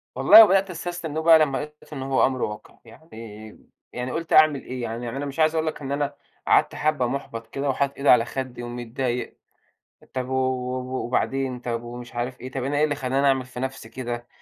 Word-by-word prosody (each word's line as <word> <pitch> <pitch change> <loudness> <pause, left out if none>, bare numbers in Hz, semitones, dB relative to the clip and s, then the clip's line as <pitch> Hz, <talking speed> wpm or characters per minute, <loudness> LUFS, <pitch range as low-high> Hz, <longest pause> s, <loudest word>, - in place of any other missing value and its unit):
والله 225 - +9
وبدأت 195 -1 +3
أستستلم 175 -2 -5
إنّه 155 +2 -2
بقى 160 0 +7
لمّا 140 -3 +2
لقيت 150 +1 -9
إنه 135 -2 -5
هو - - +5
أمر 130 -1 -2
واقع. 105 0 -5
يعني 110 -4 -12 0.3
يعني 125 +1 -4
قُلت 165 +3 -3
أعمل 155 -3 +5
إيه! 130 0 -6
يعني 120 +1 -4
أنا 130 - -6
أنا 145 - -3
مش 140 +2 -7
عايز 155 0 +3
أقول 160 0 0
لك 155 - -4
إن 135 -1 -5
أنا 140 0 -1 0.3
قعدت - - +3
حبّة 150 -4 0
مُحبّط 115 -3 -5
كده 140 +4 -3
وحاطط 140 +1 -1
إيدي 140 - +1
على 115 -2 +6
خدِّي 130 -1 -5
ومتضايق، 120 +1 -4 0.8
طب 130 -1 -3
و - - -3
و 130 0 -2
وبعدين، 130 +1 -1
طب 120 -1 -4
ومش 120 0 -9
عارف 125 +2 -4
إيه، 130 +1 -7
طب 130 -1 -4
أنا 140 +2 -1
إيه 150 - +3
اللي 150 -1 +1
خلّاني 135 +1 0
أعمل 135 -2 +2
في 125 -1 -9
نفسي 130 -3 -5
كده، 120 -1 -5
130 Hz, 210 wpm, -24 LUFS, 120-145 Hz, 0.8 s, والله